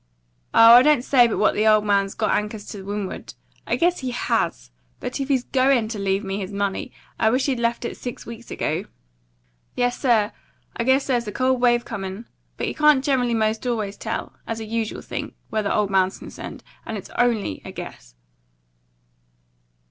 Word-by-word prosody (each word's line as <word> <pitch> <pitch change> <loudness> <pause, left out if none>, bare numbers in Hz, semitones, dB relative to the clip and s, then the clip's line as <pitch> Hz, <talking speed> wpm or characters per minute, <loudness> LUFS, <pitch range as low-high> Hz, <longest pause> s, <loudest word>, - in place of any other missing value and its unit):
Oh, 230 +1 +8
I - - +8
don't 295 -2 +4
say 250 -3 +5
but 225 - -2
what 215 - +3
the 215 +1 +1
old 215 -1 +5
man's 200 -1 +1
got - - 0
anchors 210 0 -2
to 200 - -7
windward; 200 0 -5 0.3
guess 350 +1 +2
he 260 - -3
HAS; 240 - -1 0.3
but - - -4
if 275 - -2
he's 265 -3 +1
GOIN' 255 -4 +2
to 220 -2 -4
leave 195 +1 0
me 195 0 -3
his 190 0 -5
money, 200 -1 -2 0.3
I 220 - +4
wish 255 +3 +1
he'd 265 -4 0
left 235 0 0
it - - -4
six 245 - -7
weeks 235 0 -10
ago. 165 +6 -2 0.9
Yes, 245 0 0
sir, 225 -5 +3 0.4
I 235 - -2
guess 265 +2 +3
there's 240 -4 0
a - - -3
cold 255 +2 +1
wave 240 -1 +3
comin'; 195 +3 -6 0.3
but - - -2
you - - -2
can't 300 -3 +4
generally 250 -4 +1
'most 220 +2 0
always 215 -4 -2
tell, 225 +2 -4
as 225 0 -3
a 220 - -5
usual 225 0 -3
thing, - - -6 0.2
where 220 - +1
the 200 - -1
old 205 -2 +1
man's 190 0 +2
concerned, - - -9 0.2
and 220 - -5
it's 195 - -10
ONLY 230 - 0
a - - -8
guess." - - -9
225 Hz, 190 wpm, -23 LUFS, 205-245 Hz, 0.9 s, Oh